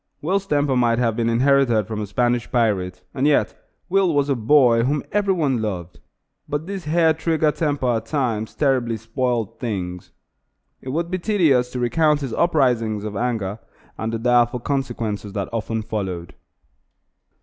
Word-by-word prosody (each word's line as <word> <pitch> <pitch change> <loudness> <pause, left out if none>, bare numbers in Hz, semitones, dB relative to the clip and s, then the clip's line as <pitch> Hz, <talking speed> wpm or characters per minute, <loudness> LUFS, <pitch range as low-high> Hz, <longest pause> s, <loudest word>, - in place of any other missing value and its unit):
Will's 195 +5 -1
temper 145 -4 +1
might 120 -2 +2
have 115 -3 +1
been 115 0 0
inherited 120 -2 +3
from 110 0 -4
a 105 - -4
Spanish 120 +2 0
pirate, 95 -7 0
and 135 +3 +1
yet 150 - +2 0.3
Will 190 -3 +2
was 145 0 +2
a 140 - +2
boy 120 0 +4
whom 140 +4 0
every 200 -2 +1
one 140 -8 0
loved; 90 -5 -5 0.5
but 145 +2 -2
this 195 -2 -6
hair 160 +1 +3
trigger 160 -1 +1
temper 145 -7 0
at 110 0 -7
times 115 -7 -2
terribly 125 -5 +1
spoiled 115 -1 -2
things. 90 -7 -4 0.7
It 130 - -8
would 170 +5 -2
be 185 - -1
tedious 160 - +2
to 125 - -3
recount 150 +5 +2
his 130 -5 -4
uprisings 120 -10 +1
of 105 -1 -5
anger, 110 -3 -2 0.4
and 110 +1 -3
the 115 - -2
direful 120 +1 +2
consequences 115 -7 -3
that 100 -2 -3
often 115 0 -2
followed. 95 -6 -4
125 Hz, 160 wpm, -22 LUFS, 110-145 Hz, 0.7 s, boy